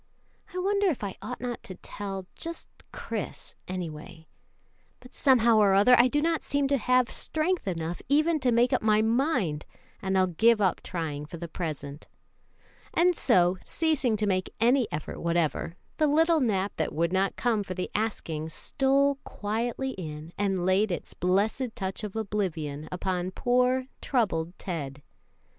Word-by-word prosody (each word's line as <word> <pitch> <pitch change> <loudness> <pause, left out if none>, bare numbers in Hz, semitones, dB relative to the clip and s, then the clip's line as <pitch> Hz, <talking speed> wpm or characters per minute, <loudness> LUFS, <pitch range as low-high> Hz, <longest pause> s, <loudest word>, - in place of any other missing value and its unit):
I 365 - -7
wonder 400 +2 +2
if 300 - -1
I 195 -2 -4
ought 250 - -6
not 245 -1 -4
to 185 - -8
tell 195 0 -6
just 335 0 -6 0.2
Chris, - - -5
anyway; 165 -2 -6 0.7
but 250 - -16
somehow 235 -4 +4
or 200 -2 +5
other 205 +6 +6
I 245 +1 +6
do 295 +4 0
not 330 -1 +1
seem 285 -1 0
to 280 -1 +2
have 250 +2 +2
strength 320 - -1
enough 170 -1 -3
even 310 +3 +3
to 260 -3 +2
make 240 +3 +3
up 255 - +2
my 215 0 +3
mind, 225 - +1 0.4
and 190 0 0
I'll 185 - +5
give 220 +6 +3
up 190 -3 +1
trying 150 -4 -4
for 170 - -8
the 170 +1 -6
present;" 155 -3 -6 0.9
and 355 +1 +4
so, 185 - +3
ceasing 290 -9 0
to 210 - 0
make 185 -2 0
any 245 +1 +4
effort 150 0 -5
whatever, 170 -1 0 0.2
the 305 - +3
little 325 +3 +4
nap 205 -6 0
that - - -1
would 170 +3 +1
not 190 +1 +1
come 230 -3 +1
for 185 -2 -5
the 180 - -4
asking 165 -8 -2
stole 275 - +1
quietly 235 +5 -2
in 160 -4 -7
and 195 -3 0
laid 190 +2 +3
its 175 - -5
blessed 210 +7 0
touch 195 -2 -4
of 210 -1 -5
oblivion 170 -9 -3
upon 180 0 -2
poor, 250 +5 +1 0.2
troubled 180 - 0
Ted. 145 -6 -5
205 Hz, 160 wpm, -28 LUFS, 175-255 Hz, 0.9 s, other